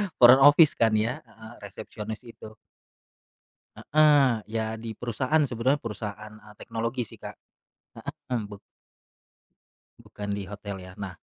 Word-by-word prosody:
front 125 +2 +8
office 145 +3 +6
kan 110 -1 +3
ya, 115 +4 0
heeh 110 +1 -13
resepsionis 110 +2 -8
itu. 110 -2 -12 1.2
Heeh, 145 -6 +4 0.2
ya 110 0 -2
di 110 -1 -7
perusahaan 130 +7 0
sebenarnya 130 +5 0
perusahaan, 105 -1 -6
eee, 105 0 -16
teknologi 115 +3 -4
sih 110 - -10
Kak. - - -8 1.0
Mhm, 110 -3 -2
bu 100 - -9 1.4
bukan 105 0 -8
di 100 - -4
hotel 100 -1 -7
ya, 90 0 -11
nah 95 -3 -6
110 Hz, 130 wpm, -26 LUFS, 105-125 Hz, 1.4 s, front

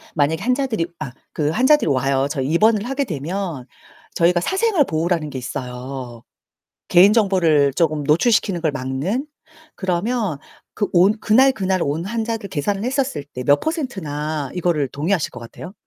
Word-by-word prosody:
만약에 155 +2 +1
환자들이 250 -8 0
아 135 -5 -6 0.2
그 150 -1 0
환자들이 260 - +3
와요. 135 0 +1
저희 135 -3 -2
입원을 215 +5 +3
하게 275 +1 -1
되면 165 - -4 0.5
저희가 175 +1 +3
사생활 380 - +2
보호라는 165 -1 -1
게 135 - -6
있어요. 125 -1 -6 0.7
개인 185 +4 +6
정보를 170 - +3
쪼금 155 -3 +1
노출시키는 185 - +2
걸 160 -2 +1
막는. 145 - -2 0.5
그러면 190 - -1 0.4
그 205 - 0
온 190 +5 +4
그날그날 215 -6 +3
온 155 +5 -2
환자들 225 -1 -3
계산을 195 +8 -2
했었을 255 - -1
때 125 -3 -8
몇 145 0 +4 0.4
%나 150 -2 -4
이거를 170 -5 0
동의하실 155 +4 -1
것 125 - -9
같아요? 170 +10 -10
170 Hz, 325 characters per minute, -20 LUFS, 145-210 Hz, 0.7 s, 개인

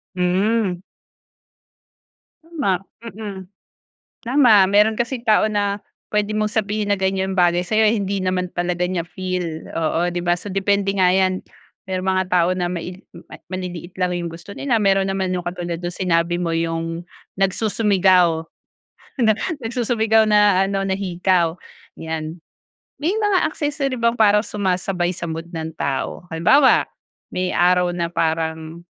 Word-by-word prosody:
Hmm. 185 +1 +1 1.6
Tama! 275 - -1 0.2
Mm. 205 -4 -7 0.8
Tama. 250 -3 +5
Meron 210 +2 +4
kasing 240 +1 -2
tao 215 -2 +4
na 205 -1 0 0.3
puwede 210 0 0
mong 215 0 0
sabihin 210 -1 -1
na, - - -1
"ganiyan 190 0 -1
bagay 175 0 +3
sa'yo" 220 +3 +2
hindi 200 -3 -1
naman 185 -1 -1
talaga 175 0 -1
niya 180 -2 -2
feel, 180 -2 -4
oo, 165 +2 0
'di 175 - -2
ba, 175 0 +2
so 190 +4 -8
depende 195 +1 +1
nga 185 -1 +4
'yan. 185 0 +2 0.5
Merong 185 0 -2
mga 185 0 +1
tao 180 -1 +3
na 180 -1 -2
maili 180 +1 -6 0.5
maliliit 180 -1 -6
lang 180 -1 0
'yong 170 -1 -4
gusto 165 +4 -11
nila 255 -1 0
meron 195 -1 +2
naman 190 -1 -1
'yong 180 -1 -3
katulad 175 -1 -4
nung 175 0 -4
sinabi 170 -2 +1
mo 170 -1 -1
'yong 165 +1 -2 0.3
nagsusumigaw, 190 -4 +3 0.8
nag 220 -3 +4 0.3
nagsusumigaw 225 -2 +2
na 205 -2 +4
ano 195 0 -1
na 190 - 0
hikaw, 180 -3 +1 0.4
'yan. 160 +1 -5 0.6
May 310 +7 0
mga 415 -3 +2
accessory 290 -3 -2
bang 235 -1 +1
para 210 -1 +5
sumasabay 185 -3 -1
sa 170 -1 -5
mood 165 +1 -5
ng 160 -1 -4
tao? 140 +5 -3
Halimbawa, 260 - +4 0.4
may 180 0 -2
araw 180 0 +3
na 170 -1 -2
parang, 160 0 -2
185 Hz, 140 wpm, -21 LUFS, 175-210 Hz, 1.6 s, Tama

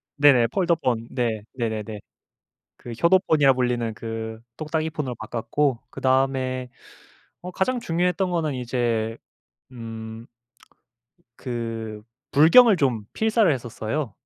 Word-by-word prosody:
네네. 140 -5 +5
폴더폰. 130 - 0
네. 115 -4 -1
네네네. 110 -3 -3 0.8
그 120 - -10
효도폰이라 155 - +4
불리는 120 -3 -1
그 110 0 -6 0.2
똑딱이 155 +1 -2
폰으로 130 -6 -4
바꿨고, 120 +4 -1
그다음에 130 -1 0 0.7
어 180 +1 -7
가장 245 +8 0
중요했던 180 0 0
거는 160 -4 0
이제 120 -2 -1 0.5
음 115 -1 -8 1.1
그 115 -3 -5 0.3
불경을 190 - +7
좀 125 -8 0
필사를 220 -5 +3
했었어요. 120 0 -3
125 Hz, 235 characters per minute, -24 LUFS, 115-155 Hz, 1.1 s, 불경을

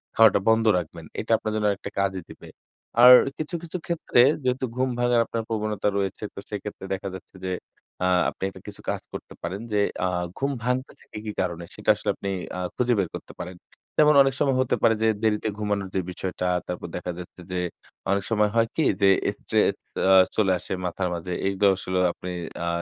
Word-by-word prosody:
খাওয়াটা 110 -2 +6
বন্ধ 110 0 +4
রাখবেন। 85 -1 -5
এটা 110 - -3
আপনার 110 - -3
জন্য 105 -1 +1
একটা 100 - -7
কাজই 95 -1 0
দিবে। - - -12 0.6
আর 125 +1 +12 0.2
কিছু, 155 +3 -4
কিছু 170 +2 -5
ক্ষেত্রে 170 -7 +2 0.2
যেহেতু 130 +1 0
ঘুম 130 +1 +1
ভাঙার 120 -1 +3
আপনার 115 0 -3
প্রবণতা 110 -2 -1
রয়েছে 100 +1 -2
তো - - -8
সেক্ষেত্রে 105 -1 -6
দেখা 95 +1 -4
যাচ্ছে 95 +1 -12
যে 95 - -1 0.5
আ - - +3 0.2
আপনি - - -9
একটা - - -13
কিছু - - -9
কাজ - - -1
করতে - - -8
পারেন 90 +4 -4
যে 105 - +3 0.3
আ - - +2 0.3
ঘুম 140 +1 0
ভাঙতে 125 +2 -1
থাকে - - -11
কি 105 - -2
কারণে? 85 -2 -3
সেটা - - -4
আসলে - - -4
আপনি 100 - -5 0.3
আ - - -3 0.2
খুঁজে 125 0 +2
বের 95 -4 0
করতে - - -9
পারেন। 90 +1 -6 0.4
যেমন 150 0 +6
অনেক 135 -1 +3
সময় 135 -3 +2
হতে 130 - +1
পারে 115 - +6
যে - - +4 0.2
দেরিতে 110 0 +1
ঘুমানোর 105 -2 -1
যে 95 - +2
বিষয়টা 90 0 -3 0.2
তারপর 90 - -4
দেখা 90 0 -3
যাচ্ছে 90 0 -10
যে 90 - -1 0.5
অনেক 100 0 +1
সময় 105 -2 +3
হয় 115 0 +4
কি? 160 - +2 0.2
যে 100 - +6 0.3
স্ট্রেস - - +2 0.3
আ - - +7 0.2
চলে 100 -3 +3
আসে 85 - -5
মাথার 90 +1 -1
মাঝে 90 +1 -4
এই 100 - +1 0.2
আসলে 95 -1 -2
আপনি 90 - -7 0.4
আ - - -2
105 Hz, 195 wpm, -25 LUFS, 95-120 Hz, 0.6 s, আর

